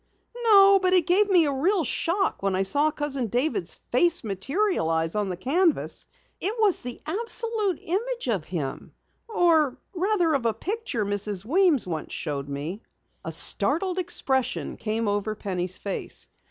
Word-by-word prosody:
"No, 395 Hz, -2 st, +7 dB
but 370 Hz, -1 st, +2 dB
it 360 Hz, -3 st, +4 dB
gave 395 Hz, +4 st, +3 dB
me 355 Hz, -4 st, +5 dB
a 285 Hz, -, 0 dB
real 345 Hz, +7 st, +1 dB
shock 350 Hz, +7 st, 0 dB
when 195 Hz, -1 st, 0 dB
I 190 Hz, -, +1 dB
saw 285 Hz, +11 st, +2 dB
Cousin 280 Hz, -5 st, -3 dB
David's 240 Hz, -, 0 dB, 0.2 s
face 340 Hz, +6 st, +3 dB
materialize 195 Hz, -, -1 dB
on 210 Hz, -2 st, -1 dB
the 180 Hz, -, -4 dB
canvas. 325 Hz, -, 0 dB, 0.3 s
It 410 Hz, +4 st, +2 dB
was 420 Hz, -4 st, +3 dB
the 245 Hz, -1 st, -6 dB
absolute 430 Hz, +1 st, -1 dB
image 470 Hz, -, -3 dB
of 200 Hz, -10 st, -1 dB
him 150 Hz, -7 st, -5 dB, 0.3 s
or 330 Hz, -, +2 dB, 0.2 s
rather 360 Hz, -3 st, +1 dB
of 260 Hz, -5 st, +1 dB
a 220 Hz, -, 0 dB
picture 365 Hz, -, -3 dB
Mrs. 205 Hz, -1 st, -1 dB
Weems 335 Hz, -, +3 dB
once 160 Hz, -4 st, -5 dB
showed 145 Hz, -3 st, -4 dB
me." 150 Hz, +9 st, -5 dB, 0.4 s
A -, -, -5 dB
startled 370 Hz, +2 st, +2 dB
expression 265 Hz, -8 st, -1 dB
came 220 Hz, 0 st, -2 dB
over 205 Hz, +1 st, -1 dB
Penny's 185 Hz, -3 st, -1 dB
face. 200 Hz, -, -5 dB
280 Hz, 155 wpm, -25 LUFS, -, 0.4 s, No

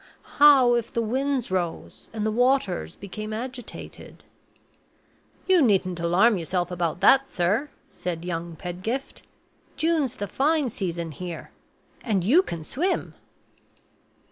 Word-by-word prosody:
How 275 Hz, -4 st, +7 dB
if 235 Hz, -2 st, -1 dB
the 235 Hz, -, -1 dB
winds 260 Hz, 0 st, -1 dB
rose 175 Hz, -3 st, -4 dB
and 215 Hz, -1 st, -3 dB
the 220 Hz, -, +1 dB
waters 235 Hz, -, +1 dB
became 215 Hz, +2 st, -7 dB
agitated?" 245 Hz, +1 st, -8 dB, 1.2 s
"You 375 Hz, -3 st, +5 dB
needn't 190 Hz, -, +2 dB
alarm 185 Hz, +5 st, +3 dB
yourself 175 Hz, +1 st, -2 dB
about 175 Hz, -1 st, -2 dB
that, 270 Hz, +6 st, +5 dB
sir," 205 Hz, +12 st, 0 dB, 0.2 s
said 175 Hz, -1 st, -5 dB
young 170 Hz, -1 st, -4 dB
Pedgift; 185 Hz, -, -5 dB, 0.6 s
"June's 315 Hz, -6 st, +1 dB
the 205 Hz, -, -4 dB
fine 285 Hz, -, +1 dB
season 170 Hz, -5 st, -3 dB
here 170 Hz, +1 st, -7 dB, 0.5 s
and 200 Hz, -6 st, 0 dB
you 275 Hz, -, +5 dB
can 170 Hz, -, -6 dB
swim." 345 Hz, -, -2 dB
215 Hz, 120 wpm, -25 LUFS, 175-265 Hz, 1.2 s, How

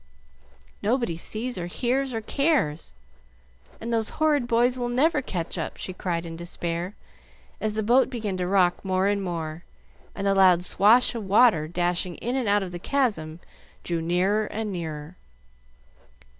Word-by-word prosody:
"Nobody 230 Hz, -5 st, 0 dB
sees 220 Hz, +6 st, -2 dB
or 175 Hz, -, -4 dB
hears 255 Hz, +7 st, -1 dB
or 225 Hz, -2 st, -3 dB
cares, 220 Hz, -, 0 dB, 0.8 s
and 235 Hz, +1 st, -4 dB
those 225 Hz, -1 st, +1 dB
horrid 300 Hz, -5 st, +2 dB
boys 245 Hz, +2 st, +3 dB
will 245 Hz, -1 st, -3 dB
never 290 Hz, +5 st, +2 dB
catch 175 Hz, -9 st, -4 dB
up!" -, -, -4 dB
she 185 Hz, -, -6 dB
cried 175 Hz, -2 st, -3 dB
in 165 Hz, -1 st, -7 dB
despair, 170 Hz, +2 st, -4 dB, 0.6 s
as 215 Hz, -1 st, -2 dB
the 220 Hz, -, -1 dB
boat 245 Hz, +5 st, +4 dB
began 220 Hz, -6 st, -3 dB
to 180 Hz, -1 st, -2 dB
rock 180 Hz, -2 st, +2 dB
more 190 Hz, -1 st, +1 dB
and 200 Hz, 0 st, +1 dB
more, 165 Hz, -3 st, -4 dB, 0.5 s
and 200 Hz, -, -4 dB
the 195 Hz, -, +3 dB
loud 185 Hz, -3 st, +5 dB
swash 215 Hz, +8 st, +4 dB
of 225 Hz, -4 st, -5 dB
water 195 Hz, -6 st, +4 dB
dashing 175 Hz, +1 st, -1 dB
in 245 Hz, +2 st, -3 dB
and 250 Hz, -6 st, 0 dB
out 205 Hz, 0 st, +3 dB
of 185 Hz, -, -6 dB
the 175 Hz, -, -6 dB
Chasm 175 Hz, -, -1 dB, 0.4 s
drew 170 Hz, -1 st, -2 dB
nearer 185 Hz, +6 st, +1 dB
and 215 Hz, -1 st, -4 dB
nearer. 160 Hz, -2 st, -6 dB
195 Hz, 160 wpm, -25 LUFS, 175-240 Hz, 0.8 s, loud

